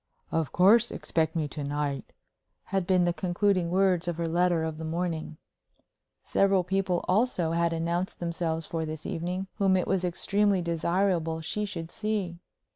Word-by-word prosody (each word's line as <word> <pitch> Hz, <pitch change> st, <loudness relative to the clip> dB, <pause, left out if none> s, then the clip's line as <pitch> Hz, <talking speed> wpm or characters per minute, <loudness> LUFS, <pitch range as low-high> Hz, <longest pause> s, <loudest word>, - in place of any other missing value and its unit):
"Of 160 Hz, -3 st, 0 dB
course, 215 Hz, +6 st, +5 dB
expect 160 Hz, 0 st, -1 dB
me 155 Hz, -2 st, 0 dB
to 150 Hz, -, -5 dB
night," 145 Hz, -1 st, -3 dB, 0.5 s
had 190 Hz, -2 st, -2 dB
been 185 Hz, -2 st, +4 dB
the 175 Hz, -, +1 dB
concluding 185 Hz, 0 st, +1 dB
words 180 Hz, -1 st, +2 dB
of 175 Hz, -2 st, -2 dB
her 170 Hz, -1 st, -1 dB
letter 175 Hz, 0 st, +2 dB
of 160 Hz, -1 st, -4 dB
the -, -, -5 dB
morning. 160 Hz, -1 st, -3 dB, 0.9 s
Several 195 Hz, -2 st, +3 dB
people 185 Hz, -1 st, 0 dB
also 185 Hz, -5 st, +2 dB
had 170 Hz, 0 st, +1 dB
announced 170 Hz, +3 st, -2 dB
themselves 165 Hz, -1 st, -2 dB
for 165 Hz, 0 st, -3 dB
this 155 Hz, -1 st, -6 dB
evening 180 Hz, +3 st, -3 dB
whom 190 Hz, -2 st, +4 dB
it 180 Hz, -, 0 dB
was 190 Hz, -1 st, 0 dB
extremely 200 Hz, +3 st, +1 dB
desirable 170 Hz, 0 st, 0 dB
she 210 Hz, +6 st, -2 dB
should 170 Hz, -5 st, -6 dB
see. 205 Hz, -5 st, -2 dB
175 Hz, 160 wpm, -28 LUFS, 165-190 Hz, 0.9 s, course